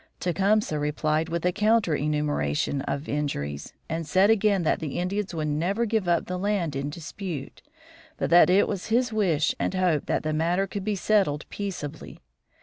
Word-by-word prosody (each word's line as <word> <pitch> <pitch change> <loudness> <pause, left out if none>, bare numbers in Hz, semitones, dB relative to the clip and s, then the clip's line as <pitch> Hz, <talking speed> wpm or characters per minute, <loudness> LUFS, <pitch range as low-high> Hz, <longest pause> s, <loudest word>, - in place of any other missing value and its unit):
Tecumseh 190 -1 +1
replied 155 +2 0
with 170 +1 -2
a 180 - +3
counter 215 -2 +2
enumeration 145 - -1
of 140 +2 -3
injuries, 75 - -3 0.2
and 160 -1 -3
said 190 +7 +4
again 205 -4 +2
that 155 - +1
the 155 -4 -4
Indians 195 +3 -2
would 155 -1 -2
never 180 +10 0
give 220 -4 0
up 170 -1 +2
the 180 0 -4
land 190 -7 -1
in 140 +1 -2
dispute, 165 -1 -7 0.6
but - - -2
that 175 +1 +7
it 190 +3 +4
was 195 -4 -4
his 235 +1 +1
wish 175 -7 +2
and - - -1
hope 180 -6 +1
that - - 0
the 155 0 -1
matter 170 +5 +1
could 195 +1 -5
be 210 +1 -1
settled 190 -7 +1
peaceably. 180 -7 -6
175 Hz, 175 wpm, -26 LUFS, 150-200 Hz, 0.6 s, that